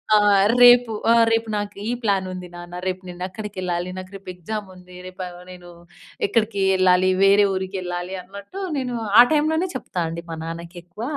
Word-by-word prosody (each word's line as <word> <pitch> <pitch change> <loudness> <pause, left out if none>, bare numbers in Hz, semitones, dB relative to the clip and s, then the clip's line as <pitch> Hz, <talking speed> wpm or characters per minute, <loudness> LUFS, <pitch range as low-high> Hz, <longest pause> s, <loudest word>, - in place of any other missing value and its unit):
ఆ! - - +7 0.4
రేపు 245 -1 +7 0.2
ఆ! - - +7 0.2
రేపు 225 0 0
నాకు 205 0 -4
ఈ - - 0
ప్లాన్ 200 -3 +1
ఉంది 180 -1 -7
నాన్న, 175 0 -9
రేపు 185 0 -2
నేను 175 0 -10
అక్కడికి 210 +2 -8
వెళ్ళాలి, 175 -1 -2
నాకు 185 +1 -8
రేపు 195 -1 -12
ఎక్సామ్ 205 +4 -6
ఉంది, 180 0 -15
రేపు 185 +1 -9
ఆవ 175 0 -11
నేను 180 -1 -12 0.6
ఇక్కడికి 210 -1 0
వెళ్ళాలి, 185 0 +3
వేరే 200 +1 +6
ఊరికి 190 +1 -4
వెళ్ళాలి 180 +1 -5
అన్నట్టు 200 - -10 0.2
నేను, 250 -3 -3 0.2
ఆ - - +13
టైంలోనే 315 +3 +1
చెప్తా 185 -8 -4
అండి 170 +1 -6
మా 165 - -4
నాన్నకి 170 +2 -7
ఎక్కువ. 185 +6 -10
185 Hz, 185 wpm, -22 LUFS, 180-215 Hz, 0.6 s, ఆ